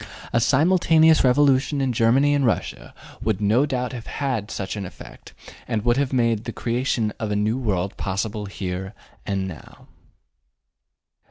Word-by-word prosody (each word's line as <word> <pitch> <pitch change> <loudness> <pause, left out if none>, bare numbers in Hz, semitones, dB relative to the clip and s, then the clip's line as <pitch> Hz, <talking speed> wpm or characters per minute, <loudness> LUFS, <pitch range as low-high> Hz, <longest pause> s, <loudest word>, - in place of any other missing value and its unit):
A 120 - +4
simultaneous 160 +3 +4
revolution 135 +2 +3
in 135 -2 0
Germany 130 +5 +3
and 145 -1 +1
Russia 115 -4 -2 0.3
would 110 -3 -1
no 110 +7 +2
doubt 125 -2 -2
have 120 -2 -8
had 125 -7 -3
such 95 -1 -4
an 100 - -4
effect, 90 - -12 0.3
and 110 -2 -2
would 120 +1 +3
have 140 -2 0
made 115 -4 +1
the - - -4
creation 120 -2 -1
of 110 - -3
a 105 - -1
new 105 +4 0
world 95 -6 -2
possible 105 +2 -3
here 95 +1 -5 0.3
and 95 -2 -1
now. 80 -5 -11
115 Hz, 155 wpm, -23 LUFS, 105-135 Hz, 0.3 s, A